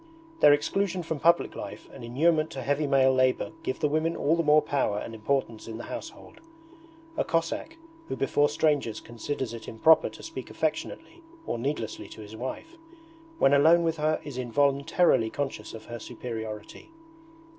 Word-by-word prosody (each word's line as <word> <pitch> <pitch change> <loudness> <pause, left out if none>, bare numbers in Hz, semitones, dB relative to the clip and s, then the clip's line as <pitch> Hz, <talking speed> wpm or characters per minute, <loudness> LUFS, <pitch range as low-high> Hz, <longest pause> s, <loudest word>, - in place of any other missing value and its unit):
Their 145 - +8
exclusion 180 +5 +1
from 160 -2 -3
public 170 +3 +3
life - - -8
and - - -10
inurement 155 +6 +2
to 130 - -5
heavy 145 +3 0
male 135 -1 +4
labour 130 +3 +2
give 130 - -3
the 150 - +3
women 155 +3 0
all 155 +3 +2
the 170 - +1
more 150 -1 +5
power 135 -8 0
and 115 +2 -5
importance 115 0 -2
in 110 -1 -6
the 120 - -7
household. - - -9 0.8
A - - +2
Cossack, 170 - -2 0.3
who - - -3
before 145 +2 +2
strangers 145 -8 +1
considers 120 +1 -5
it 115 -2 -8
improper 160 +8 +4
to - - -13
speak 330 +2 -7
affectionately 340 - -3 0.2
or 120 - -3
needlessly 130 -3 -3
to - - -10
his 105 +1 -10
wife, 130 - -6 0.6
when 135 - +4
alone 160 +4 +6
with 165 -1 0
her 155 +1 +1
is 140 -4 -6
involuntarily 140 0 +2
conscious 135 -5 -4
of 110 - -10
her 120 0 -7
superiority. 110 - -7
140 Hz, 165 wpm, -27 LUFS, 120-155 Hz, 0.8 s, Their